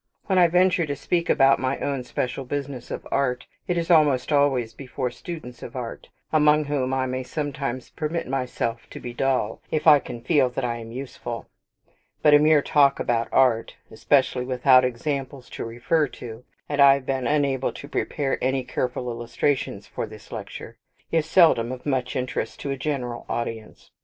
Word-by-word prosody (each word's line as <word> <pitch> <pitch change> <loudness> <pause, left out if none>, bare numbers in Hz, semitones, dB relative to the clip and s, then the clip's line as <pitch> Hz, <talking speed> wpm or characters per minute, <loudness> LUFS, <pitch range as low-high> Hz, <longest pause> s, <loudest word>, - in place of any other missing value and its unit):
When 190 -2 +2
I 175 - +7
venture 180 0 +3
to 145 - -2
speak 170 +4 -1
about 135 0 +5
my 130 +2 -1
own 140 -3 -2
special 125 +2 -3
business 140 -1 -5
of - - -6
art, 125 -3 0 0.2
it 175 - 0
is 170 +1 0
almost 150 -5 +4
always 135 -6 +2
before 130 0 -4
students 155 -6 -8
of - - -9
art, 120 -3 -6 0.2
among 150 0 +4
whom 140 -3 -1
I 130 0 0
may 130 0 -2
sometimes 140 -2 -4
permit 160 +2 -3
myself 125 -3 -3
to - - -9
be 120 - -7
dull, 130 -4 0
if 155 - -1
I 150 -3 +8
can 120 - -8
feel 130 0 +3
that 125 +1 -3
I 120 -1 -2
am 115 -1 -9
useful: 120 -2 -6 0.7
but 150 - +6
a 145 - +8
mere 150 -1 +4
talk 140 -2 +4
about 115 -1 0
art, 125 -4 +2 0.2
especially 130 +2 +2
without 130 0 +4
examples 135 +1 -3
to - - -5
refer 125 +7 0
to 115 0 -9 0.2
(and 145 -1 0
I 140 -1 +8
have 140 -1 -6
been 135 -1 -1
unable 140 -3 +1
to 140 - -9
prepare 140 -1 -2
any 130 0 +1
careful 125 0 -3
illustrations 120 +3 -2
for - - -5
this - - -13
lecture), - - -8 0.3
is 160 -1 +1
seldom 160 -10 +4
of 130 -1 -7
much 130 -3 -1
interest 125 0 -3
to 140 - -3
a - - -1
general 130 -4 -3
audience. 115 -2 -5
135 Hz, 180 wpm, -24 LUFS, 125-145 Hz, 0.7 s, I